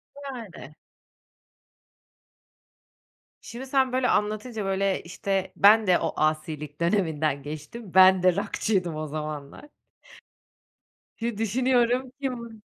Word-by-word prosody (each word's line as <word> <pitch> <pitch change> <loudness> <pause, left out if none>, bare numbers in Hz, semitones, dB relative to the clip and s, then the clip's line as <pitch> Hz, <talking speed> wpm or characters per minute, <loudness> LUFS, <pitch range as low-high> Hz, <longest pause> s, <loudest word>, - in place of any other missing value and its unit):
Yani. 240 - -9 2.7
Şimdi 240 +3 -8
sen 265 -1 +2
böyle 255 -1 +1
anlatınca, 215 +1 -1
böyle, 195 0 0
işte, 190 +2 -3
ben 215 +1 +6
de 180 -1 +4
o - - -2
asilik 155 -1 -2
döneminden 160 -6 0
geçtim, 155 - -8
ben 185 -1 +7
de 185 -1 +4
rock'çıydım 195 -3 -1
o 155 0 -4
zamanlar. 150 - -7 1.5
Hı 230 -2 -3
düşünüyorum. 245 +3 +1
Kim? 235 -5 -5
195 Hz, 100 wpm, -26 LUFS, 160-235 Hz, 2.7 s, ben